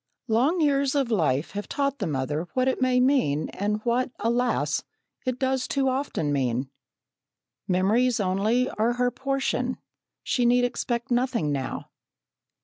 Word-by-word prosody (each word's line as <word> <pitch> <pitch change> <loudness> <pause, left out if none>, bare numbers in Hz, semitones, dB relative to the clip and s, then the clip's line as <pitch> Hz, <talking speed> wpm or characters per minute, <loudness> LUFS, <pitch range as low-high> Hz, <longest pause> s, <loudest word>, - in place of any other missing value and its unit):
Long 265 +10 +2
years 280 -2 +2
of 270 -4 +1
life 155 - +1
have 205 +1 -5
taught 280 0 -1
the - - -1
mother 150 +3 -2
what 255 0 +2
it 260 - 0
may 255 -1 +3
mean 250 - +2
and 210 +2 -2
what, 245 +2 +1
alas, 240 +2 0 0.4
it 255 -1 0
does 260 0 0
too 270 -1 +1
often 255 - -1
mean. 130 -1 -1 1.0
Memories 215 +7 +2
only 210 +6 +1
are 230 0 0
her 245 0 +1
portion; 265 -2 -1 0.5
she 250 - 0
need 245 +1 +4
expect 245 0 -2
nothing 240 - +1
now. 135 -2 -4
245 Hz, 140 wpm, -26 LUFS, 190-260 Hz, 1.0 s, need